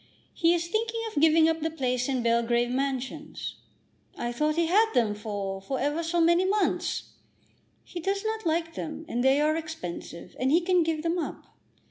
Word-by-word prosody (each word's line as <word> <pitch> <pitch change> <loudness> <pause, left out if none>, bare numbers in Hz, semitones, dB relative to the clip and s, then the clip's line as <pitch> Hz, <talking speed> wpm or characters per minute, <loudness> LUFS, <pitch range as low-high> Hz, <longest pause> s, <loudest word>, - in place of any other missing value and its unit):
He 335 0 +3
is 340 0 -2
thinking 450 +4 -1
of 315 -10 -2
giving 320 0 +6
up 325 0 +1
the 320 - 0
place 255 -5 -1
in 255 -3 0
Belgrave 235 +1 +2
Mansions." 270 +3 -3 0.6
"I 240 - -2
thought 300 +5 0
he 335 0 +2
had 430 +7 +3
them 225 -4 +3
for 205 -2 -4
for 265 +7 -3
ever 295 +4 0
so 335 +1 0
many 340 +2 +4
months." 405 +2 0 0.7
"He 350 - -7
does 395 +4 -1
not 440 0 -2
like 330 0 0
them, 320 0 -6
and 245 -5 -1
they 265 +2 +4
are 305 +1 +2
expensive, 180 - -6
and 255 - +1
he 330 +5 +4
can 360 0 +3
give 320 -1 -1
them 335 +1 0
up. - - -6
315 Hz, 185 wpm, -27 LUFS, 250-340 Hz, 0.7 s, giving